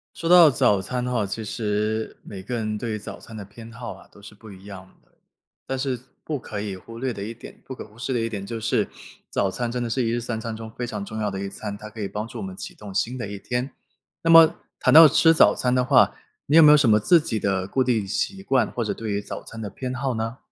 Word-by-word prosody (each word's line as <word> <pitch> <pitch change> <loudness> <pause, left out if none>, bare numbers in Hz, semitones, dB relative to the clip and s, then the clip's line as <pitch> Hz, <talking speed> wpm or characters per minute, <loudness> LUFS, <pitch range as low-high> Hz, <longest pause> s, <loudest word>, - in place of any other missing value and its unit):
说 165 +1 -3
到 175 -3 +9
早 125 -7 +3
餐 125 +6 -3
的 125 - -2
话， 115 -5 0
其 110 +3 -5
实 105 0 -2
每 100 - -9
个 105 +7 -6
人 110 -2 -2
对 110 -1 -3
早 105 - -8
餐 115 - -12
的 105 - -7
偏 110 +4 -12
好 120 0 -7
啊， - - -16
都 100 - -17
是 105 - -12
不 105 +2 -15
一 95 0 -13
样 95 -2 -10 0.2
的。 - - -35 0.6
但 135 - -2
是 130 -1 -2 0.2
不 150 -3 -3
可 105 -4 -6
以 100 -2 -4
忽 115 +5 -11
略 130 +1 -2
的 100 - -8
一 115 +3 -6
点 115 - -13
不 130 - -6
可 - - -8
忽 105 - -20
视 130 +2 -3
的 120 - 0
一 115 - -1
点 100 -3 -6
就 115 +2 -5
是， 115 -1 0 0.4
早 100 - 0
餐 120 +4 -3
真 125 0 -2
的 120 - -3
是 125 +2 0
一 - - 0
日 120 - -1
三 115 -1 -4
餐 115 0 -5
中 110 0 -8
非 120 - -2
常 105 -3 -5
重 110 +2 -6
要 105 -1 -1
的 95 - -4
一 100 - -4
餐， 100 +1 -6
它 105 +1 -10
可 110 +1 -10
以 100 - -2
帮 105 +3 -5
助 - - -9
我 - - -5
们 190 0 -7
启 195 -2 -8
动 100 - -10
新 125 +5 -1
的 115 - -4
一 100 -1 -7
天。 125 +5 -3 0.5
那 165 - +2
么 165 -1 +8 0.2
谈 - - +3
到 160 0 +11
吃 165 +3 +5
早 - - +6
餐 125 0 0
的 125 - +2
话， 130 0 +4 0.3
你 150 - +3
有 165 - +9
没 150 - +8
有 150 - +9
什 145 -5 +3
么 105 -1 +5
自 170 +10 +5
己 115 -8 -3
的 95 -2 0
固 130 +7 0
定 115 -5 0
习 195 - -2
惯， 130 - +2
或 120 - -3
者 105 - -2
对 115 -1 -5
于 100 0 -1
早 - - -7
餐 115 - -10
的 105 - -4
偏 125 +6 -5
好 130 0 -2
呢？ 115 +3 -4
115 Hz, 305 characters per minute, -24 LUFS, 105-130 Hz, 0.6 s, 到